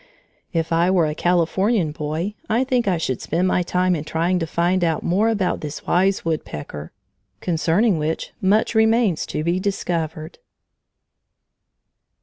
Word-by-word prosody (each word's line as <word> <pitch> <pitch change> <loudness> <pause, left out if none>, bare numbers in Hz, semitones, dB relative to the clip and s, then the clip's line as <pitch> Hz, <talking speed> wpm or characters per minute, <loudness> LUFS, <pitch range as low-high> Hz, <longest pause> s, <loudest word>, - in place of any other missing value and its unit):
If 165 0 -1
I 170 +2 +3
were 180 -3 +3
a 150 - -1
Californian 175 +2 +1
boy, 155 +6 -3 0.2
I 230 +4 +2
think 250 -4 0
I 185 -3 +2
should 130 -6 -2
spend 175 +4 0
my 180 - +2
time 180 +1 +1
in 150 - -4
trying 170 +3 0
to 165 - -2
find 175 +3 +1
out 165 -2 0
more 205 +6 +2
about 200 -5 0
this 150 -1 -6
wise 190 +1 +1
woodpecker, 75 - -4 0.5
concerning 175 +3 +1
which 155 +2 -2
much 205 +5 +2
remains 220 -5 +2
to 155 - -3
be 170 +3 0
discovered. 165 -5 -3
175 Hz, 145 wpm, -21 LUFS, 160-195 Hz, 0.5 s, I